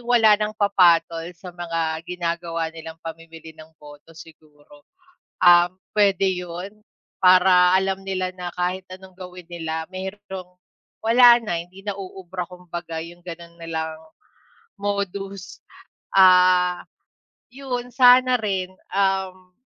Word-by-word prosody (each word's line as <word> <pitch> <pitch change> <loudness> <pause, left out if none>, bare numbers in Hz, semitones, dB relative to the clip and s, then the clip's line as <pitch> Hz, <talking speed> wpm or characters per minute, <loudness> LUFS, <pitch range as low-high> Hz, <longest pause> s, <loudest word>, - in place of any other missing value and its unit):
wala 220 -3 +5
ng 210 0 -2
papatol 170 -5 +3
sa 180 +1 -11
mga 165 -2 -3
ginagawa 170 -2 -3
nilang 160 0 -10
pamimili 165 0 -10
ng 155 0 -15
boto, 150 +2 -15
siguro? 150 -2 -17 0.5
Um, 175 +1 +5 0.2
puwede 195 -2 +3
'yon 180 +2 -5 0.4
para 180 0 +5
alam 190 0 -1
nila 185 -1 -3
na 180 -1 -6
kahit 180 +1 -2
anong 185 0 -12
gawin 180 -1 -10
nila 160 -1 -4
merong 190 -1 -8 0.4
wala 240 +1 +6
na, 175 -8 -3
hindi 185 +3 -15
na 205 - -2
uubra, 185 -2 -7
kumbaga, 175 -2 -8
yong 170 +2 -10
gano'n 170 -1 -10
nilang 160 -1 -5 0.8
modus. 200 -1 -4 0.6
Ah, 180 -1 +5 0.7
'yon 250 -2 -5
sana 255 0 +6
rin, 190 -4 -3 0.2
um, 190 -1 -1
180 Hz, 115 wpm, -22 LUFS, 170-195 Hz, 0.8 s, wala